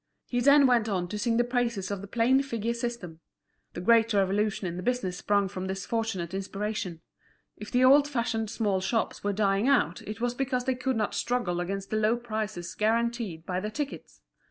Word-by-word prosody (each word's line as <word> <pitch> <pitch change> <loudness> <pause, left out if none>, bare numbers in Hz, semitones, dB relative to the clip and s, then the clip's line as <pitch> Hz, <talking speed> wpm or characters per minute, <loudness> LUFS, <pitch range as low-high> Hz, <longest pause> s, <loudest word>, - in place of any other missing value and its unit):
He 245 - -1
then 280 +3 +6
went 240 -4 +3
on 180 -3 -1
to 210 - -4
sing 230 +1 +1
the 240 - +4
praises 235 -6 -1
of 200 -2 -3
the 200 - -8
plain 240 +5 +3
figure 235 -4 -2
system. 235 -9 -5 0.5
The - - -5
great 230 +3 +4
revolution 200 +1 +1
in 170 -1 -3
the 180 - -5
business 195 -5 -1
sprung 200 0 +1
from 190 0 -5
this 190 0 -4
fortunate 195 -7 -2
inspiration. 195 -3 -4 0.5
If 210 - -9
the 250 +1 +2
old 280 +2 +6
fashioned 230 -5 -1
small 205 -4 0
shops 225 +4 -1
were 205 - +1
dying 200 +2 +1
out 240 - +2
it 215 +1 -7
was 240 0 0
because 255 -1 -1
they 260 - +2
could 255 +1 -2
not 215 -2 -1
struggle 220 -8 -1
against 195 +2 -4
the 215 - +1
low 215 +2 +2
prices 215 -6 -4
guaranteed 225 -6 -1
by 180 0 -2
the 210 +3 -3
tickets. 285 +5 -6
215 Hz, 200 wpm, -28 LUFS, 195-240 Hz, 0.5 s, then